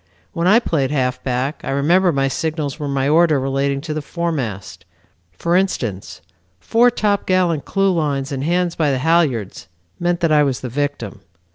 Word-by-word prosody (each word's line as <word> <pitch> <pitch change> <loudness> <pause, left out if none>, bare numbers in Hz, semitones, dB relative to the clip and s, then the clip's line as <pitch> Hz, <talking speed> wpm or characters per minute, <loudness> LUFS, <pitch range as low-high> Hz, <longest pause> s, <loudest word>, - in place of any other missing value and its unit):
When 170 0 0
I 210 +4 +6
played 155 - 0
halfback 130 0 -2
I - - -5
remember 170 +7 +3
my 135 -2 +1
signals 155 +1 -3
were 145 - -3
my 135 -1 0
order 155 -1 +4
relating 135 +1 -1
to 155 +1 -5
the 155 - -3
foremast. 130 - -4 0.5
For 170 - -1
instance, 120 - -2 0.4
'Fore 230 - +3
top 210 -4 -1
gallant 175 -6 +1
clew 195 -1 +1
lines 145 -5 -1
and 135 -1 -3
hands 175 +2 0
by 155 -3 +1
the 135 - 0
halyards' 135 - 0 0.3
meant 175 0 0
that 165 -2 +2
I 150 -1 +5
was 135 -3 0
the 125 - -5
victim. 145 +3 -4
150 Hz, 170 wpm, -19 LUFS, 135-170 Hz, 0.5 s, I